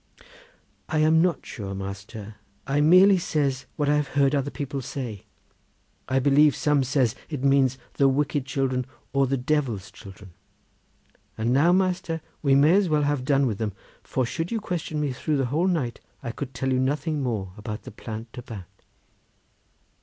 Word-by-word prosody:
"I 155 - 0
am 155 +1 +5
not 175 -4 0
sure, 100 -4 -6
master; 100 +2 -7 0.3
I 140 +2 +1
merely 185 +5 +7
says 140 -7 -1
what 145 - 0
I 150 +1 +4
have 150 -1 0
heard 140 0 +4
other 140 -1 0
people 140 -2 -4
say. 120 -6 -6 0.8
I 130 - +2
believe 140 +2 +5
some 145 -2 +2
says 130 -3 +1
that - - -22 0.2
it 135 - -5
means 135 -2 +3 0.2
the 140 -1 +4
wicked 145 +1 0
children, 130 -2 -1 0.3
or 140 -1 +3
the 135 +1 0
Devil's 125 -8 -1
children. 95 -1 -13 1.1
And 115 +3 +1
now, 150 +6 +5
master, 180 -2 +1 0.2
we 140 -2 +4
may 145 +4 +6
as 195 -2 +3
well 150 -1 +2
have 145 -2 0
done 140 0 +3
with 110 -6 -2
them, 110 -3 -2 0.3
for 130 - -1
should 165 +7 -3
you 230 - 0
question 170 -6 -3
me 145 -3 -1
through 150 +3 -1
the 135 - +1
whole 170 +5 +2
night 145 -11 -1 0.2
I 120 - -3
could 135 +1 -7
tell 130 +1 0
you 130 - +2
nothing 150 +3 0
more 105 -8 -2
about 105 0 -6
the - - -9
Plant 110 +1 -7
de 125 - -8
Bat." 105 -6 -8
135 Hz, 180 wpm, -25 LUFS, 120-150 Hz, 1.1 s, merely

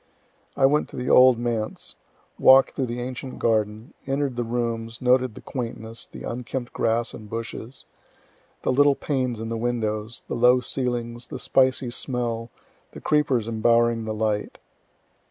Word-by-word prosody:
I 135 - +5
went 150 +3 +2
to - - -11
the 125 - -2
old 130 -1 +7
Manse, 115 -2 -3 0.4
walk'd 135 0 +7
through 130 - -2
the 120 +1 -4
ancient 130 +1 -6
garden, 110 0 0
enter'd 135 -1 -1
the 120 - -1
rooms, 115 -1 -3
noted 125 -2 +2
the - - -10
quaintness, 115 -2 -5
the - - -11
unkempt 120 +1 -5
grass 115 +1 0
and 105 -1 -10
bushes, 115 +2 -6 0.8
the - - +1
little 145 +2 +4
panes 130 -6 -2
in 115 0 -5
the 115 - -2
windows, 110 -2 -2
the - - -4
low 125 +1 +5
ceilings, 120 -2 -3
the - - -6
spicy 130 -1 +2
smell, 120 -2 -3 0.4
the - - -8
creepers 140 -7 +1
embowering 115 0 +2
the 110 - -3
light. 105 -1 -1
120 Hz, 155 wpm, -24 LUFS, 115-130 Hz, 0.8 s, old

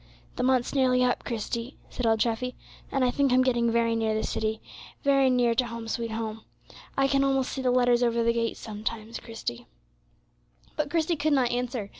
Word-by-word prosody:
"The - - -2
month's 255 -1 +2
nearly 255 -2 +3
up, 250 0 +1
Christie," 235 +2 -4
said 245 - -2
old 225 -1 +2
Treffy; 245 +2 -1 0.4
"and 270 -2 +2
I 250 - +2
think 275 +1 +1
I'm 255 +1 +5
getting 240 -2 +2
very 230 0 +2
near 220 -1 0
the 220 - -1
city, 220 0 -2 0.4
very 275 -1 +4
near 245 -2 +3
to 245 +1 +1
'Home, 230 -1 -7
sweet 230 +1 -2
Home.' 220 0 -4 0.5
I 275 0 +4
can 275 0 +2
almost 270 -1 +1
see 265 - -3
the 255 - +1
letters 245 -1 +3
over 235 -1 +2
the 235 0 +3
gate 230 -1 -1
sometimes, 220 +1 -5
Christie." 235 +1 -6 1.1
But 300 -2 -1
Christie 330 +1 0
could 300 +1 +1
not 255 -4 +2
answer. 245 -4 -2
240 Hz, 195 wpm, -27 LUFS, 230-260 Hz, 1.1 s, I'm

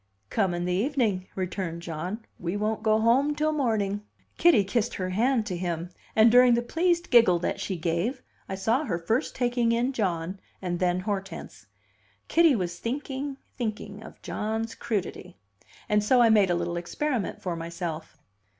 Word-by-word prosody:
"Come 190 -5 +1
in 175 0 -2
the 180 - 0
evening," 210 -4 0
returned 180 -2 -3
John. 180 +7 -5
"We 175 +3 -2
won't 215 +1 -1
go 215 0 +3
home 260 +6 +3
till 310 +1 +1
morning." 220 -8 0 0.4
Kitty 330 -12 +6
kissed 225 +3 -1
her 185 -1 -3
hand 230 +3 +2
to 185 - -3
him, 175 -1 -3 0.2
and, 220 +1 +6
during 245 0 +7
the 240 - 0
pleased 340 +5 0
giggle 230 -8 +6
that 170 - -2
she 190 - -3
gave, 170 - -1 0.3
I 190 - -2
saw 225 +9 +1
her 180 -10 -1
first 220 +9 -1
taking 240 -1 +1
in 240 +3 +1
John 185 -4 -2 0.2
and 175 -2 -3
then 180 0 +1
Hortense. 190 - -5 0.6
Kitty 330 -4 +5
was 175 -4 -3
thinking, 275 +2 -4 0.2
thinking, 215 -3 -4
of - - -12
John's 220 +1 -3
"crudity." 190 -5 -4 0.5
And 210 0 +2
so 250 +4 +4
I 235 -1 +6
made 210 -4 +5
a 175 - +2
little 170 0 -2
experiment 240 +6 -2
for 180 -2 -2
myself. 165 -1 -5
210 Hz, 170 wpm, -27 LUFS, 180-240 Hz, 0.6 s, during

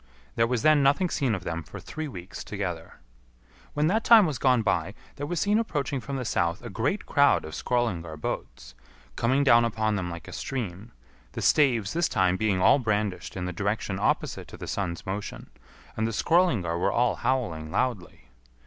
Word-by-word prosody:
There 115 - +3
was 120 -2 -1
then 155 -2 +5
nothing 145 +6 +2
seen 130 -7 0
of 95 - -7
them 85 -1 -3
for 75 - -10
three 155 0 -6
weeks 95 -7 -8
together. 90 -5 -5 0.8
When 150 +1 +2
that 215 +8 +1
time 225 -4 +7
was 150 -7 -2
gone 125 -4 +3
by, 100 -1 0 0.2
there 145 - -4
was 175 +1 -2
seen 205 +5 +2
approaching 145 - -2
from 140 +3 -5
the 130 -2 -3
south 85 0 -1
a 120 - -7
great 140 - -1
crowd 140 - +3
of 80 - -8
Skrœlingar 85 -11 -2
boats, - - -5 0.4
coming 130 +4 +2
down 120 -4 +6
upon 110 -2 0
them 90 -2 -3
like 85 -1 -8
a - - -9
stream, 110 -4 -5 0.4
the - - -5
staves 120 -9 +3
this 170 +1 +1
time 95 -5 +2
being 100 -1 0
all 135 - +5
brandished 105 -5 -2
in 90 - -3
the 90 - -4
direction 100 +1 -2
opposite - - -1
to - - -11
the - - -7
sun's 90 -4 -3
motion, 100 +2 -6 0.4
and 110 0 0
the - - -2
Skrœlingar 110 - +2
were - - +1
all 120 0 +1
howling 85 -13 -1
loudly. 105 -2 -3
110 Hz, 190 wpm, -27 LUFS, 90-140 Hz, 0.8 s, time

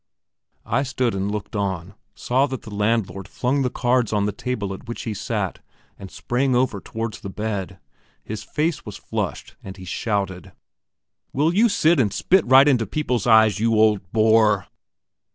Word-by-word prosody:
I - - +1
stood 130 -3 -1
and 95 +1 -2
looked 105 0 -5
on, 95 -2 -3 0.2
saw 130 +3 +1
that 130 -2 -6
the 110 - -9
landlord 105 -2 -1
flung 130 +7 -1
the 130 - +1
cards 125 -1 +1
on 105 -1 +1
the 105 - 0
table 105 -2 -4
at 95 - -11
which 120 - -6
he 110 - -3
sat, 105 -2 -3 0.4
and 95 - -10
sprang 130 +5 -1
over 120 -6 +1
towards 115 -1 -5
the 100 - -7
bed. 100 -2 -4 0.5
His 110 -1 -6
face 155 +6 -2
was - - -8
flushed, - - -5
and 95 0 -9
he 95 - -10
shouted: 95 -2 -3 0.8
"Will 155 +5 +2
you 225 +5 +4
sit 170 -5 +3
and 110 -6 +2
spit 180 - +2
right 135 +3 +7
into 125 -6 +2
people's 125 -7 -1
eyes, 110 -3 +5
you 115 +1 +2
old 105 -4 +2
boar?" 110 -3 +3
110 Hz, 170 wpm, -22 LUFS, 100-125 Hz, 0.8 s, right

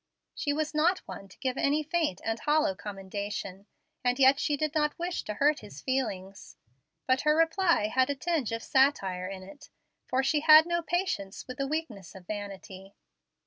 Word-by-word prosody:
She 290 - -2
was 305 +1 -2
not 335 +5 +2
one 195 - -8
to - - -17
give 260 -1 -2
any 295 +2 +2
faint 315 - -1
and 225 0 -1
hollow 305 0 +2
commendation, 200 -2 -6 0.4
and 245 0 +1
yet 270 +1 +5
she 290 - 0
did 305 +1 -1
not 300 -2 0
wish 350 +1 -3
to 210 - -4
hurt 295 +5 +2
his 180 -8 -11
feelings. 200 - -4 0.5
But 260 0 +2
her 300 +1 +3
reply 330 - +3
had 260 +5 +1
a 285 - 0
tinge 310 -4 -1
of 230 0 -3
satire 195 -10 +2
in 190 -1 -7
it, 290 +10 -14 0.4
for 260 +1 +1
she 295 +3 +2
had 310 +1 +8
no 345 0 0
patience 335 - -2
with 255 +1 -8
the 275 - 0
weakness 260 - -5
of 185 -2 -12
vanity. 195 -1 -8
265 Hz, 185 wpm, -29 LUFS, 200-310 Hz, 0.5 s, had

